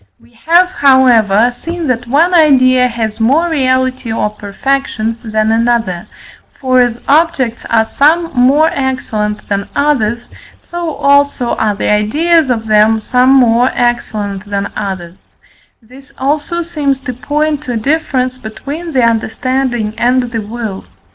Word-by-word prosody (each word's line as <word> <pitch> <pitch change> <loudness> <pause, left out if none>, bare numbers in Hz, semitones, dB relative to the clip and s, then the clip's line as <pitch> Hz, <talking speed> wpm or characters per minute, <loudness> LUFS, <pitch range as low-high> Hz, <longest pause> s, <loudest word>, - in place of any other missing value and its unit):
We 115 +1 -24
have, 350 +2 +5
however, 245 - +3
seen 335 +6 -6
that 245 -1 -2
one 320 +8 +2
idea 255 -6 +4
has 225 -3 -4
more 280 +10 +2
reality 260 -5 -1
or 210 -1 -1
perfection 225 +2 -3
than 215 -1 0
another, 225 -6 0 0.5
for 255 -2 +2
as 240 -1 0
objects 275 -6 +1
are 225 -1 +2
some 325 +7 +1
more 275 +5 +3
excellent 220 -6 -3
than 200 -1 -3
others, 240 -6 0 0.4
so 345 -3 -5
also 280 -3 +1
are 210 -1 -1
the - - -1
ideas 300 +9 +2
of 225 -3 -1
them 215 +1 +3
some 250 +4 +1
more 250 -2 +4
excellent 210 -5 -2
than 200 0 -3
others; 185 -3 -7 0.5
this 260 +5 -16
also 295 +5 -2
seems 295 -5 -2
to 260 -2 -5
point 295 +4 -2
to 265 -5 -5
a - - -1
difference 255 -1 -1
between 290 +9 -7
the 255 -2 +2
understanding 235 0 -1
and 245 0 +1
the 225 -2 -3
will. 215 -2 -6
250 Hz, 140 wpm, -13 LUFS, 220-280 Hz, 0.5 s, have